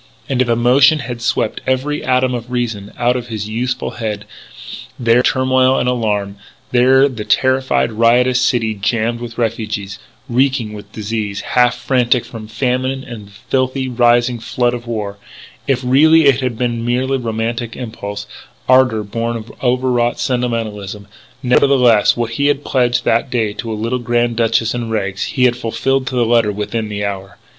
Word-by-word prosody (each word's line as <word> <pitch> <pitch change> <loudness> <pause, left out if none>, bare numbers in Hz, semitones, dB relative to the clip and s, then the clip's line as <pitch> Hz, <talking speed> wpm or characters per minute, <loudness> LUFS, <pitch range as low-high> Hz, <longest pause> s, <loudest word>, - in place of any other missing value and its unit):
And 130 -2 0
if 125 - 0
emotion 125 +6 +4
had 120 -3 -6
swept 115 -2 -1
every 130 +3 -1
atom 130 0 +1
of 120 0 -5
reason 115 -5 -3
out 120 0 +2
of 125 -1 -4
his 110 -3 -5
youthful 125 +3 -2
head, 105 -3 -4 0.7
there 115 -1 +3
in - - +5
the - - +2
turmoil 130 0 +2
and - - 0
alarm 105 -5 -1 0.3
there 130 +2 +5
in 140 -1 +2
the 105 - -3
terrified, 130 0 +1
riotous 120 +3 +3
city 115 -3 +1
jammed 115 +3 -1
with 120 -1 -8
refugees, 110 -3 -3 0.3
reeking 125 -3 0
with 105 0 -10
disease, 105 -2 -4
half 125 -1 +2
frantic 125 -2 +1
from 110 -2 -9
famine 130 +3 -1
and 115 -6 -9
the - - -18 0.2
filthy, 130 0 0
rising 120 0 +2
flood 120 +2 -1
of 120 -1 -6
war 105 -3 -4 0.5
if 130 -2 0
really 155 +5 +5
it 140 -3 +5
all - - -5
had 125 -3 -2
been 120 -1 -1
merely 130 +3 0
romantic 115 0 -3
impulse, 105 -4 -6 0.4
ardour 130 -4 +4
born 115 +3 -3
of 110 0 -10
overwrought 125 -1 +1
sentimentalism, 110 -5 -3 0.4
nevertheless, 125 -4 +4
what 120 -1 -2
he 140 +5 0
had 145 0 0
pledged 125 -2 +1
that 115 +3 +1
day 110 -4 -1
to 115 +2 -5
a - - -2
little 115 +4 -2
Grand 120 0 0
Duchess 115 0 +1
in 120 -2 -4
rags, 100 -3 -2
he 130 - -1
had 125 -1 +4
fulfilled 130 +3 -1
to 130 - -3
the 120 -1 +2
letter 115 -2 +3
within 105 +2 -3
the 105 -1 -3
hour. 100 0 -6
120 Hz, 175 wpm, -17 LUFS, 110-125 Hz, 0.7 s, in